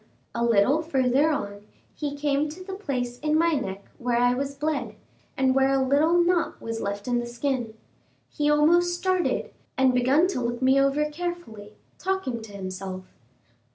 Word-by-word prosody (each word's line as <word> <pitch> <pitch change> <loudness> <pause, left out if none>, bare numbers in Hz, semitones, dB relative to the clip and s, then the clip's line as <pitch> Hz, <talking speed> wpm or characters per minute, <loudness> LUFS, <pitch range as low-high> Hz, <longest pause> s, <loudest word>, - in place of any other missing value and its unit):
A 235 - -1
little 235 +6 +3
further 275 -1 +2
on, 205 -9 -3 0.3
he 290 -2 -4
came 290 +1 0
to 345 +5 -9
the 385 +1 -7
place 250 -10 -3
in 305 0 +1
my 335 +1 +3
neck 195 -8 -3
where 240 -1 0
I 245 +1 +4
was 275 +2 -3
bled, 280 -7 -2 0.4
and 265 -1 +3
where 270 0 +3
a 265 -1 +2
little 295 +5 +3
knot 345 0 +1
was 230 0 -5
left 200 +2 -4
in 245 -1 +1
the 240 - -4
skin. 240 -2 -2 0.5
He 295 0 -1
almost 345 +4 +4
started, 370 -1 0 0.3
and 260 -1 +4
begun 260 +7 +4
to 255 - -2
look 240 0 -2
me 265 +1 +4
over 275 +2 +2
carefully, 295 -12 -6 0.3
talking 370 -11 -2
to 220 -1 -11
himself. 185 -1 -6
270 Hz, 170 wpm, -25 LUFS, 235-305 Hz, 0.5 s, I